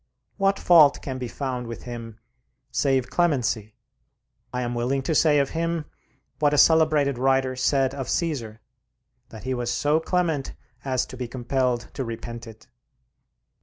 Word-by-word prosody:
What 195 -1 +2
fault 155 -5 +6
can 130 -2 -4
be 125 - -4
found 125 0 -4
with 115 - -7
him, 115 -2 -8 0.5
save 135 -3 +1
clemency? 125 -10 0 0.8
I 125 0 -2
am 120 0 -3
willing 125 +3 -1
to 160 - -1
say 150 -1 +4
of 140 -1 +1
him 165 -1 -2 0.5
what 150 -1 +3
a - - 0
celebrated 155 -5 +4
writer 135 0 +2
said 135 +1 +1
of 135 -2 -5
Cæsar, 130 -11 -2 0.7
that 110 - -11
he 130 +1 -2
was 120 -1 -2
so 150 +5 +2
clement 165 -5 -1 0.3
as 130 -2 0
to - - -10
be 125 -1 -4
compelled 125 0 -1
to 135 - -3
repent 115 0 -7
it. 110 -1 -13
130 Hz, 155 wpm, -24 LUFS, 120-150 Hz, 0.8 s, fault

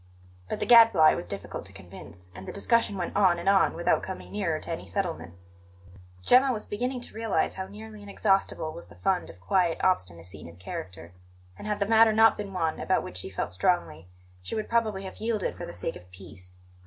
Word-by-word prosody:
But - - -3
the - - -1
Gadfly 225 -10 +7
was 90 - -5
difficult 100 +3 -6
to 95 - -14
convince, 90 -1 -12
and 95 - -10
the - - -4
discussion 220 0 +1
went 175 - -4
on 185 -4 +4
and 170 +2 -6
on 195 -1 +4
without 170 - +1
coming 190 - -7
nearer 175 -7 -1
to - - -8
any 165 - -5
settlement. 175 - -3 0.9
Gemma 260 - +5
was 215 -4 -3
beginning 250 +4 -3
to - - -8
realize 225 -1 0
how 190 0 -5
nearly 215 +1 -11
inexhaustible 195 -5 0
was 170 - -10
the - - -16
fund 190 -2 -1
of - - -13
quiet 170 - +1
obstinacy 90 - -1
in - - -10
his 85 0 -13
character; 90 -1 -8 0.4
and, 210 - -9
had 210 -1 -1
the 200 - +1
matter 220 +1 +5
not 225 +1 +6
been 205 -1 -6
one 165 -4 -1
about 190 - +1
which 90 - -7
she 95 - -4
felt 95 -2 -4
strongly, 90 - 0 0.3
she 90 - -5
would 215 - -3
probably 220 -4 0
have 190 - -8
yielded 220 -3 -1
for - - -7
the - - -7
sake 90 - -4
of 90 +1 -13
peace. 90 -1 -12
185 Hz, 210 wpm, -27 LUFS, -, 0.9 s, Gadfly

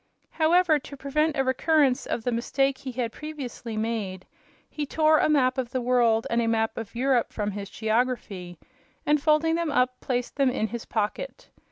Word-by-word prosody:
However, 325 -1 +3
to 280 +1 -11
prevent 300 +3 0
a 270 - +3
recurrence 265 0 +2
of 230 - -2
the 245 - 0
mistake 265 +3 0
he 265 - -6
had 240 -2 -2
previously 255 -6 -7
made, 215 -4 -3 0.4
he 300 - -5
tore 310 +2 +3
a - - +2
map 260 -3 +3
of 250 -2 -2
the 255 - -2
world 240 -2 +2
and 235 0 +2
a 230 - 0
map 225 -1 +1
of 225 0 -7
Europe 250 -1 +1
from 210 -1 -2
his 200 0 -6
geography, 220 -6 -2 0.5
and, 295 0 +3
folding 310 +2 +3
them 335 -1 0
up, 250 -2 +1
placed 245 0 -3
them 275 -2 +4
in 220 -3 -1
his 235 +2 -6
pocket. 220 - -3
255 Hz, 185 wpm, -26 LUFS, 230-295 Hz, 0.5 s, them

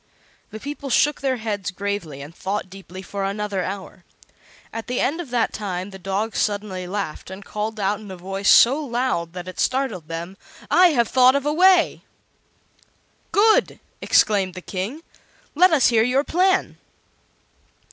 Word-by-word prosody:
The 215 - -8
people 285 +2 -6
shook 295 +3 +2
their 265 -2 0
heads 210 -4 -3
gravely 180 -7 -4
and 150 +3 -11
thought 190 +1 -4
deeply 190 -1 -10
for 200 +1 -5
another 200 -1 -2
hour. 190 -1 -7 0.7
At 225 0 -6
the 250 0 -2
end 320 +6 0
of 315 - -9
that 240 -2 0
time 190 -2 -4
the 190 - -10
dog 195 +4 -2
suddenly 200 -3 -2
laughed, 195 -4 -5
and 190 +2 -9
called 215 +1 -4
out 200 +1 0
in 210 -2 -11
a 190 - -8
voice 195 +3 -2
so 275 +6 +6
loud 240 - -2
that 180 0 -7
it 185 - -8
startled 255 - -1
them: 170 +4 -6 0.3
"I 365 0 +7
have 245 -9 +2
thought 255 +1 +5
of 280 0 -1
a 295 - +1
way!" 365 +1 +4 1.3
"Good!" 435 +2 +3 0.2
exclaimed 195 -4 +2
the 185 - -7
King. 205 - -5 0.5
"Let 360 +5 +5
us 295 -6 +4
hear 230 -2 +3
your 250 +4 +2
plan." 375 +4 +1
210 Hz, 165 wpm, -22 LUFS, 190-260 Hz, 1.3 s, I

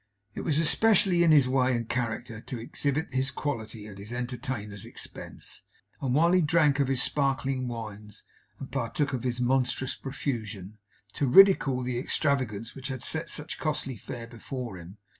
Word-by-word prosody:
It - - -5
was 150 -3 0
especially 180 +2 +4
in 165 - +5
his 145 -4 +6
way 130 -1 +2
and 115 -1 -4
character 115 -2 -3
to 125 - -6
exhibit 140 +6 -2
his 130 +1 +2
quality 115 -8 -4
at 100 -2 -10
his 105 +3 -8
entertainer's 120 -4 -4
expense; - - -8 0.4
and 130 -2 0
while 165 +3 +5
he 185 0 +5
drank 150 -3 +3
of 140 - +3
his 130 -1 +2
sparkling 135 -2 0
wines, 105 -3 -7 0.3
and 135 - -8
partook 140 +2 -1
of 125 - -1
his 125 0 -2
monstrous 130 +1 +1
profusion, 110 -7 -5 0.3
to 140 - 0
ridicule 135 -5 +6
the 125 -1 -2
extravagance 125 -6 0
which 135 0 -6
had 130 -3 -4
set 160 +5 -1
such 150 +1 -4
costly 150 -4 -1
fare 115 +2 -7
before 115 -3 -6
him. 90 +4 -11
130 Hz, 165 wpm, -28 LUFS, 115-140 Hz, 0.4 s, his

